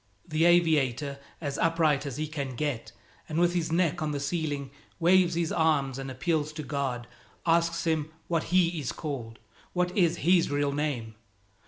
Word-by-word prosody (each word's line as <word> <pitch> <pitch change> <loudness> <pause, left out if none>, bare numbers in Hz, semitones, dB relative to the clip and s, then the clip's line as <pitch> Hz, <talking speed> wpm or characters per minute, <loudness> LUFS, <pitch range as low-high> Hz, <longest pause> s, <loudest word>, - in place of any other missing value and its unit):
The 155 +2 +2
aviator, 145 -6 +3 0.2
as 145 -4 -3
upright 160 -4 +2
as 135 - -5
he 155 - -1
can 140 -4 -4
get 120 -5 -2 0.4
and 155 - -3
with 175 0 +3
his 165 -2 -1
neck 170 -1 +1
on 155 - 0
the 145 -1 -2
ceiling, 140 -2 -2 0.3
waves 175 0 +4
his 170 -1 0
arms 145 -5 +1
and 135 0 -5
appeals 150 +3 -1
to 155 0 -5
God, 135 -4 -2 0.4
asks 170 0 +2
Him 160 -2 0 0.2
what 165 -2 0
He 175 -2 +2
is 145 - -2
called, 125 -8 -5 0.4
what 180 0 0
is 175 -3 +3
His 175 -1 +4
real 145 0 +1
name. 140 -6 -2
155 Hz, 170 wpm, -28 LUFS, 140-170 Hz, 0.4 s, waves